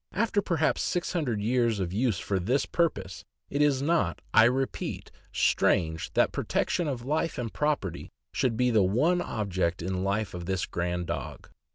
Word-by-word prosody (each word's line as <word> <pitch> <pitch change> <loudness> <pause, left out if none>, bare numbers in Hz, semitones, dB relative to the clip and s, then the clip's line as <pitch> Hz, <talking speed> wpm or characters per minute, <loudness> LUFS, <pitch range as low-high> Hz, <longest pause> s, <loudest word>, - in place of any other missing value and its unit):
After 210 -1 +1
perhaps 165 -5 +1
six 175 -1 -1
hundred 125 - -1
years 115 -2 +1
of 90 -2 -2
use 110 -1 +1
for 100 0 -1
this 125 +10 +1
purpose, 100 - -1 0.3
it 140 - 0
is 140 -2 +3
not, 115 - +1
I 110 - +7
repeat, 130 +2 -1 0.2
strange 80 -1 +1
that - - +3
protection 175 - -1
of 125 -4 -3
life 155 +4 -1
and 115 -3 -4
property 150 - -1 0.2
should 125 -4 0
be 125 0 +2
the 110 -3 +4
one 145 - +2
object 95 - -2
in 95 +1 -2
life 100 +2 -1
of 85 -1 -6
this 95 -1 0
grand 90 0 -2
dog. - - -6
115 Hz, 170 wpm, -28 LUFS, 95-145 Hz, 0.3 s, I